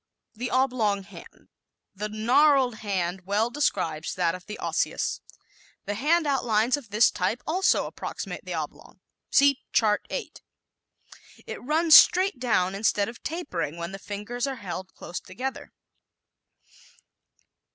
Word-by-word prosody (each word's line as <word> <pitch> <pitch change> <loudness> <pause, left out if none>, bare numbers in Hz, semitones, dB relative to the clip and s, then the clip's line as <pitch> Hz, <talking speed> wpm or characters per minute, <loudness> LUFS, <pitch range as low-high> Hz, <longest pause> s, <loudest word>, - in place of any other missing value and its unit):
The 240 +2 -4
Oblong 240 -6 +1
Hand 190 - -12
¶ - - -28 0.5
"The 210 +2 -4
gnarled 250 +3 +3
hand" 190 -4 -2
well 215 +4 +1
describes 180 - -1
that 175 -2 +1
of 185 -1 -9
the 210 - -6
Osseous. - - -1 0.6
The 205 - -2
hand 310 +9 +2
outlines 245 -4 +2
of 280 -7 -10
this 215 +3 +4
type 200 +7 -2
also 370 +4 +2
approximate - - -6
the - - -5
oblong. - - -7 0.3
(See 280 -1 +4
Chart 210 -2 +2
8) - - -6 1.0
It - - -7
runs 315 +4 +5
straight 370 -6 +6
down 190 -7 +1
instead 205 0 +1
of 235 - -11
tapering 175 - -4
when 170 +1 -5
the 195 - -7
fingers 210 +6 -4
are 270 - -3
held 185 -4 -7
close 175 - -6
together. 255 +8 -6
220 Hz, 135 wpm, -26 LUFS, 195-270 Hz, 1.0 s, straight